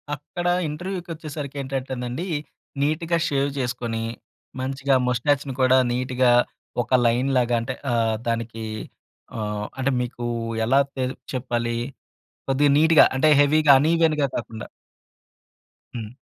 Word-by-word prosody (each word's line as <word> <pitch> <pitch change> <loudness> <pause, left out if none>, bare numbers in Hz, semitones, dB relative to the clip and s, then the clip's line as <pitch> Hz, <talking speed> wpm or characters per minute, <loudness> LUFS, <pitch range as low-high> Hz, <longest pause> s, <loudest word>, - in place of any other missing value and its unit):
అక్కడ 175 +5 -5 0.2
ఇంటర్వ్యూ‌కొచ్చేసరికి 160 -4 -6
ఏంటంటేనండి. 130 +3 -4 0.5
నీట్‌గా 165 +3 +1
షేవ్ 140 0 +1
చేసుకొని 120 -2 -2 0.6
మంచిగా 135 +1 0
మొస్టాచ్‌ని 135 +2 0
కూడా 130 0 +5
నీట్‌గా 125 0 +2 0.5
ఒక 120 - -8
లైన్ 125 +4 +2
లాగా 120 -1 +2
అంటే 125 +2 -4 0.2
ఆహ్, 115 -2 +1
దానికి 115 -1 -3 0.7
ఆహ్, 105 -1 -3
అంటే 135 +1 0
మీకు 120 0 -5 0.4
ఎలా 135 +4 +4 0.2
తే 130 -1 -1 0.3
చెప్పాలి? 120 -2 -2 0.7
కొద్దిగా 140 +1 +3
నీట్‌గా 160 0 +7
అంటే 155 +3 +4
హెవీ‌గా 150 0 +5
అన్‌ఇవెన్‌గా 155 -2 +2
కాకుండా. 115 -2 -6 1.3
హ్మ్. 110 +1 -7
130 Hz, 105 wpm, -23 LUFS, 120-145 Hz, 1.3 s, నీట్‌గా